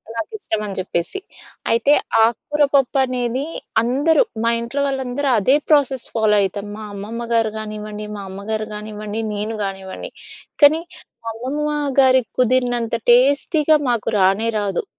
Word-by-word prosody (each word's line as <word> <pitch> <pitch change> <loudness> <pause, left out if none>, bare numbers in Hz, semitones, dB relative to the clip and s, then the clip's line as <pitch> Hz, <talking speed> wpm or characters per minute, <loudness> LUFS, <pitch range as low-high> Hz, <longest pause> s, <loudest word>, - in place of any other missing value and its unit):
నాకు 225 -1 -4
ఇష్టం 220 - -3
అని 200 -2 -6
చెప్పేసి. 180 - -2 0.5
అయితే, 235 +5 +4 0.3
ఆకుకూర 295 +6 +1
పప్పు 275 0 +2
అనేది, 250 +1 -2 0.4
అందరు 280 - +2 0.2
మా 230 - +3
ఇంట్లో 235 +5 -3
వాళ్ళందరూ 270 +1 -2
అదే 255 +7 +4
ప్రాసెస్ 275 -5 +3
ఫాలో 215 -2 +3
అయితాం. 200 +1 -2
మా 215 - -8
అమ్మమ్మగారు 225 +2 -1
గానివ్వండి, 210 -1 -6
మా - - -6
అమ్మగారు 215 +3 -4
గానివ్వండి, 210 +1 -5
నేను 210 +2 -3
గానివ్వండి, 190 -1 -6 0.5
కానీ 310 +3 +7 0.4
మా - - -2
అమ్మమ్మగారికి 270 0 +1
కుదిరినంత 245 -2 +1 0.2
టేస్టీగా 285 +5 +4
మాకు 235 -3 -1
రానే 195 +4 +3
రాదు. 205 - -1
235 Hz, 130 wpm, -20 LUFS, 210-270 Hz, 0.5 s, కానీ